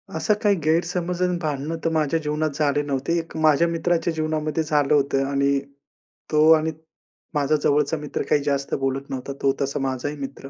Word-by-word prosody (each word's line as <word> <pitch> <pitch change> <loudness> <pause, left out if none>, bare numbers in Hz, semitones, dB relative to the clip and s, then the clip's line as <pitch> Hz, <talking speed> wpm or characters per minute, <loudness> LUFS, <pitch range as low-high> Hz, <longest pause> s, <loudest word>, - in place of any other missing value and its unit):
असं 160 +6 +2
काही 205 -1 +4
गैरसमज 175 +3 0
आणि 180 -1 +1
भांडणं 150 +1 -2
तर - - +3
माझ्या 155 0 +1
जीवनात 150 +1 0
झाले 145 -1 +2
नव्हते. 145 +3 -1
एक 165 - -8
माझ्या 155 +1 +4
मित्राच्या 170 0 0
जीवनामध्ये 155 0 -1
झालं 150 -2 +1
होतं 140 -1 +2
आणि 140 0 +2 0.7
तो 155 +1 +5
आणि 160 +1 -1 0.6
माझा 145 0 +2
जवळचा 150 +2 +2
मित्र 150 -1 -4
काही 145 - +3
जास्त 140 -1 -1
बोलत 135 +1 -2
नव्हता, 135 +1 -5
तो 135 -1 +3
तसा 140 +1 -1
माझा 135 0 -2
ही 150 - -6
मित्र 135 0 -7
150 Hz, 175 wpm, -23 LUFS, 140-160 Hz, 0.7 s, तो